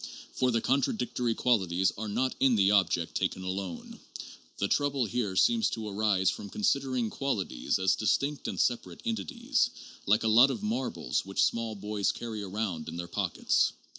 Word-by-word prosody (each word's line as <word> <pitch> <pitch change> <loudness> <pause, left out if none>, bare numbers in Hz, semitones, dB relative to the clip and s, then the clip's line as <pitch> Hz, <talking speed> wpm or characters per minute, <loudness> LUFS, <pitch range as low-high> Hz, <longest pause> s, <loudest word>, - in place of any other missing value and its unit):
For 130 - +1
the 115 -2 +1
contradictory 125 -3 0
qualities 95 -6 +2
are 110 +1 -5
not 125 +5 0
in 130 -3 +4
the 100 -1 +4
object 95 -4 +2
taken 95 - -1
alone. 95 -1 -5 0.6
The 100 - 0
trouble 140 +1 +1
here 110 -3 -2
seems 230 - +3
to 110 -1 -5
arise 100 -2 +1
from 100 - -7
considering 130 +2 0
qualities 105 - -1
as 95 0 +2
distinct 140 +6 0
and - - -4
separate 120 -1 -1
entities, 240 +2 0 0.4
like 110 +3 +3
a - - +1
lot 120 +5 +7
of 130 -5 -4
marbles 115 - -1
which 95 0 0
small 115 -2 0
boys 105 0 -1
carry 110 -3 -6
around 95 -5 -3
in 80 - -7
their 85 0 -5
pockets. - - +1
110 Hz, 165 wpm, -29 LUFS, 95-125 Hz, 0.6 s, lot